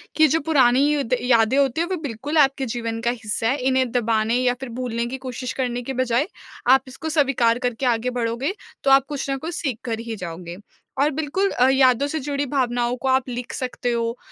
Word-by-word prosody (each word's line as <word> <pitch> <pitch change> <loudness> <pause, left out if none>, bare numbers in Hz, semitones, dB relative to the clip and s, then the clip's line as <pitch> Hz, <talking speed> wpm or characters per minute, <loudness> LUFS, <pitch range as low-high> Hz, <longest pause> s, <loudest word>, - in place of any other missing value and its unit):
कि 315 0 +6
जो 320 +3 +2
पुरानी 285 -1 +3
द 250 +1 0
यादें 235 0 +3
होती 280 +2 +2
हैं 340 - 0
वो 375 - -1
बिल्कुल 285 +3 -3
आपके 275 -2 +3
जीवन 230 -1 -3
का 240 - +4
हिस्सा 225 -2 -3
है। 275 - +1
इन्हें 260 -1 +2
दबाने 225 -1 +1
या 250 0 +2
फिर 265 - -5
भूलने 235 -2 -2
की 250 +3 -4
कोशिश 255 0 -4
करने 245 -2 -2
के 265 +2 -5
बजाय, 255 +2 +1 0.4
आप 260 +1 +6
इसको 315 +5 -6
सविकार 260 -6 +2
करके 245 0 -2
आगे 240 0 +1
बढ़ोगे 235 +8 -1 0.3
तो 275 - +3
आप 270 0 +6
कुछ 280 -1 -4
ना 270 - 0
कुछ 325 +4 -5
सीख 270 -8 -2
कर 230 -3 -3
ही 230 -1 -5
जाओगे। 175 -2 -7 0.4
और 295 - +4
बिल्कुल 315 +7 -1
अ, 250 - +3
यादों 265 0 +4
से 315 +2 -3
जुड़ी 285 0 -2
भावनाओं 245 -3 0
को - - -2
आप 260 0 +2
लिख 245 0 -5
सकते 250 -1 -3
हो, 230 0 -1
255 Hz, 215 wpm, -22 LUFS, 235-275 Hz, 0.4 s, कि